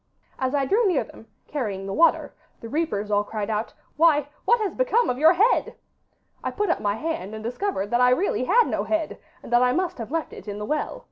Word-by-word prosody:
As 260 +2 0
I 275 -1 +1
drew 420 - +2
near 350 -7 +2
them, 225 - -15 0.2
carrying 210 -10 -3
the 195 - -4
water, 335 +7 +3 0.3
the 230 - -8
reapers 225 -9 -2
all 205 0 +3
cried 210 0 -4
out, 215 +1 -3 0.2
"Why, 300 -3 +4 0.2
what 470 +4 +4
has 420 -3 -2
become - - +2
of 250 - -5
your 320 +3 +6
head?" 420 +8 +2 0.7
I - - -1
put 415 -4 -1
up - - 0
my 205 0 0
hand 220 - -4
and 220 - -8
discovered 245 - -3
that 240 +1 +2
I 250 - +6
really 255 0 +1
had 455 - +4
no - - -1
head, 320 -1 -2 0.2
and 240 - -7
that 240 - +5
I 250 0 +3
must 360 -2 -2
have 225 - -5
left 325 +1 -3
it - - -11
in 205 0 -5
the 210 - -5
well. 305 - -2
280 Hz, 230 wpm, -24 LUFS, 220-345 Hz, 0.7 s, your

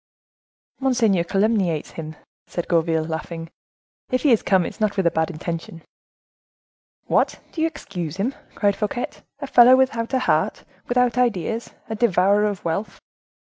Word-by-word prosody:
"Monseigneur 235 -9 +2
calumniates 195 -4 0
him," 155 -1 -7 0.3
said 175 - -4
Gourville, 165 -2 +1
laughing; 165 +1 -5 0.6
"if 255 - 0
he 290 - +4
is 230 - +4
come, 190 -3 +2
it - - -2
is - - -16
not 210 -2 0
with 190 - +1
a 170 - +4
bad 160 +1 0
intention." 165 0 -6 1.2
"What, - - +1
do 320 - -4
you 325 - +3
excuse 180 - -6
him?" 230 +8 -1 0.2
cried 200 -1 +2
Fouquet; 215 +3 -2 0.3
"a - - -2
fellow 250 -1 +7
without 245 -2 +1
a - - +4
heart, - - +1 0.2
without 250 0 +2
ideas; 230 -1 -1
a 220 - -4
devourer 205 -2 +3
of 205 -4 -3
wealth." 170 +6 -3
200 Hz, 155 wpm, -22 LUFS, 170-235 Hz, 1.2 s, fellow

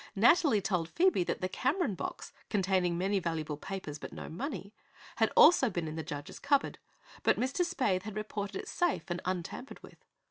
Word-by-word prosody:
Nathalie 235 - +5
told 180 -4 -1
Phoebe 360 - +3
that - - -2
the 185 - 0
Cameron 260 - 0
box, 180 - -6 0.2
containing 185 -3 +1
many 195 +2 +1
valuable 160 -4 -2
papers 155 -3 -6
but - - -7
no - - -7
money, 210 - -5 0.4
had - - +3
also 270 -7 +7
been 175 -5 -3
in 155 - -5
the 160 - -3
judge's 145 -2 -7
cupboard, 280 -1 +1 0.4
but - - +3
Mr. 260 +8 +1
Spaythe 255 - 0
had 210 +1 -7
reported 210 -1 -4
it - - -5
safe 350 -4 0
and 175 - -2
untampered 185 +8 -4
with. - - -15
195 Hz, 180 wpm, -31 LUFS, 175-260 Hz, 0.4 s, also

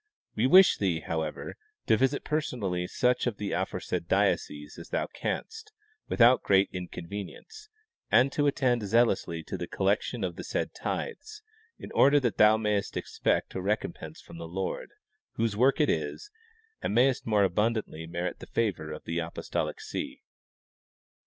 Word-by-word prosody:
We 115 +4 +2
wish 185 +6 +7
thee, 90 -5 0
however, 80 -2 -4 0.3
to 110 - +4
visit 135 +4 +1
personally 105 - -2
such 125 +3 +1
of 115 -4 -2
the 100 -2 -3
aforesaid - - -2
dioceses 75 +1 0
as - - -10
thou - - 0
canst, 445 -1 -5 0.4
without 120 +1 +5
great 95 0 +3
inconvenience, 100 - -7 0.4
and 125 +5 +5
to 145 0 +1
attend 130 -4 +2
zealously 100 -6 +1
to - - -6
the - - -4
collection 100 +3 0
of 90 -2 -3
the - - -6
said - - -2
tithes, 435 -2 -5 0.3
in - - -10
order 145 +1 +5
that 120 -5 -1
thou 105 +1 +6
ma3^est 105 -2 -1
expect - - -1
a 95 - -3
recompense 90 -5 -3
from 85 - -12
the 85 - -6
Lord, 95 +3 -4 0.4
whose 115 -2 -1
work 130 +7 +3
it 150 - +4
is, 415 - -2 0.5
and - - -2
mayest 130 +1 +3
more 105 -2 +3
abundantly 100 -4 0
merit 85 +1 -3
the - - -10
favor 95 -9 -1
of 75 - -7
the 85 +1 -2
apostolic 80 0 -3
see. - - -6
105 Hz, 155 wpm, -28 LUFS, 90-130 Hz, 0.5 s, wish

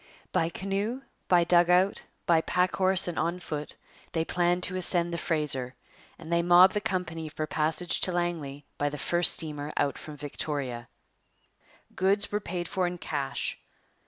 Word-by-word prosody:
By 165 - +1
canoe, 200 +8 -3 0.2
by 175 -2 +5
dugout, 180 +2 +4 0.2
by 165 -2 +4
pack 180 +3 +1
horse, 190 -1 +2
and 175 - -2
on 170 +2 -1
foot, 150 -4 -5 0.4
they 160 -1 0
planned 175 +1 +1
to 185 - 0
ascend 175 -1 0
the - - -1
Fraser, 135 -6 -1 0.4
and 165 0 -6
they 170 - +3
mobbed 175 +2 +7
the 210 - -1
company 170 -6 -3
for 155 0 -3
passage 160 +3 -1
to 185 - +1
Langley 165 -5 -3
by 145 - +1
the 150 - -6
first 175 +4 +4
steamer 150 -2 -4
out 140 - 0
from 150 -1 -9
Victoria. 140 -4 -4 1.1
Goods 195 +2 +2
were 210 - 0
paid 175 -3 -4
for 185 0 0
in 175 0 -4
cash. 140 -5 -3
170 Hz, 160 wpm, -28 LUFS, 150-180 Hz, 1.1 s, mobbed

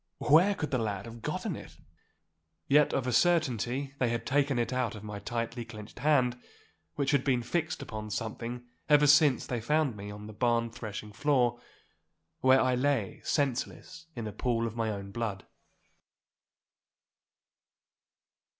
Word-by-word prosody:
Where 175 +7 +5
could 155 - -4
the 130 - +1
lad 105 -3 -2
have 115 0 -10
gotten - - -3
it?' - - -11 0.9
Yet 150 +1 +5
of 130 - -1
a 125 - -1
certainty 135 - +1
they 125 - +2
had 115 0 -2
taken 140 -1 +1
it 120 +1 0
out 125 -4 -1
of 105 - -9
my 105 -1 -6
tightly 115 +2 -3
clenched 110 -2 -11
hand, 125 -4 +2 0.5
which 140 -2 0
had 140 -3 +2
been 125 -3 +1
fixed 160 +5 -2
upon 110 -1 -6
something 115 +3 -4 0.2
ever 150 0 +6
since 145 -2 +5
they 120 -2 -3
found 150 0 +1
me 100 0 -7
on 105 0 -8
the 110 - -9
barn 115 +1 +1
threshing 105 -2 -7
floor, 120 -1 +1 0.8
where 130 0 +5
I 130 0 +2
lay 125 -5 0
senseless 145 +5 -2
in 120 -2 -4
a 105 - -4
pool 115 -2 0
of 115 -1 -4
my 115 -1 -1
own 100 -2 -5
blood. 105 -4 -3
120 Hz, 155 wpm, -30 LUFS, 110-140 Hz, 0.9 s, ever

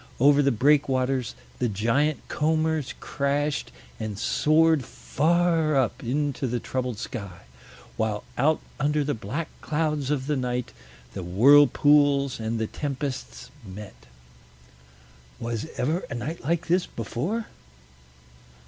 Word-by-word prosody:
Over 145 +3 +6
the 140 -1 +3
breakwaters 130 -1 +2 0.2
the 120 - +1
giant 115 +9 0
combers 155 -2 0
crashed 145 - -1 0.3
and 110 -2 -4
soared 155 +6 +3
far 165 +3 +1
up 130 -4 0
into 140 +2 -1
the 120 0 -1
troubled 125 -1 -3
sky; 100 -6 -7 0.6
while 110 -2 -1
out 155 +5 +2 0.2
under 150 +1 +1
the 145 +1 -1
black 125 +10 -4
clouds 150 -3 -1
of 140 -3 -1
the 150 +1 0
night 125 -2 -2 0.4
the 95 - -5
whirlpools 140 - +5
and 110 +1 -2
the 110 - 0
tempests 140 +2 -5
met. 95 - -11 1.3
Was 115 +3 -3
ever 155 +7 0
a - - -4
night 145 +8 -5
like 170 +3 0
this 175 +2 +1
before? 165 - -3
140 Hz, 120 wpm, -25 LUFS, 120-150 Hz, 1.3 s, Over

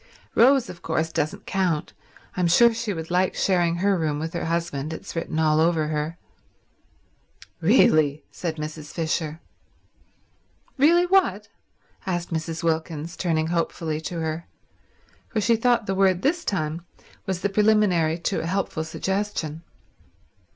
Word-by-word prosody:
"Rose, 260 +1 +5
of 170 - -10
course, 160 0 -1
doesn't 155 -1 -2
count. 180 -6 -1 0.4
I'm 180 -2 +1
sure 235 +7 +6
she 225 -1 -3
would 165 -2 -5
like 180 +1 +2
sharing 175 -3 +2
her 195 +3 +2
room 155 -4 -1
with 160 +3 -4
her 170 - -3
husband. 165 -3 -2
It's 160 - -8
written 165 -1 -3
all 155 -1 +3
over 160 -2 +2
her." 155 +2 -2 1.4
"Really—" 155 - +4
said 165 -3 -4
Mrs. 155 -1 -7
Fisher. 160 -1 -2 1.3
"Really 335 +6 +5
what?" 385 +1 +2 0.6
asked 175 -2 -2
Mrs. 160 +1 -3
Wilkins, 160 0 -2
turning 160 -3 0
hopefully 165 -2 -2
to 170 +1 -4
her, 160 +1 -3 0.8
for 225 - -1
she 230 +3 +3
thought 235 0 +2
the 195 - -1
word 190 -2 +2
this 330 +5 +1
time 165 -3 -2 0.4
was 190 -2 -2
the 200 - +1
preliminary 195 -6 +3
to 175 +3 -1
a 165 - -3
helpful 185 -3 -1
suggestion. 180 -2 -3
170 Hz, 140 wpm, -24 LUFS, 160-195 Hz, 1.4 s, sure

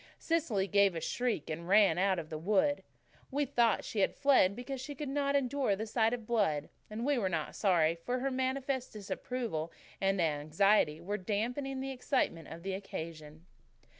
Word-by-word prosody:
Cecily 300 - 0
gave 200 -2 +4
a - - -1
shriek 235 - -1
and 165 +2 -5
ran 195 -3 +5
out 190 0 +2
of 160 -2 -6
the 155 - -4
wood. 280 - +2 0.5
We 285 +2 0
thought 240 -5 +2
she 215 - -4
had 195 - +2
fled 265 -9 +4
because 250 +2 -5
she 285 +2 -6
could 295 +2 -5
not 280 0 0
endure 270 -5 +1
the 215 +3 -4
sight 225 0 +2
of 235 -2 -4
blood, 195 -11 0 0.2
and 220 +3 -4
we 285 -2 +2
were 190 -4 0
not 160 -4 -2
sorry, 170 -5 +3
for 210 +10 -3
her 270 +2 -1
manifest 260 0 -2
disapproval 210 -5 -4 0.3
and 195 0 +2
anxiety 155 +2 +2
were 200 +5 -3
damping 245 +7 -2
the 270 0 -3
excitement 250 - -1
of 165 +1 -9
the 195 0 -3
occasion. 160 -4 -7
210 Hz, 180 wpm, -32 LUFS, 170-260 Hz, 0.5 s, ran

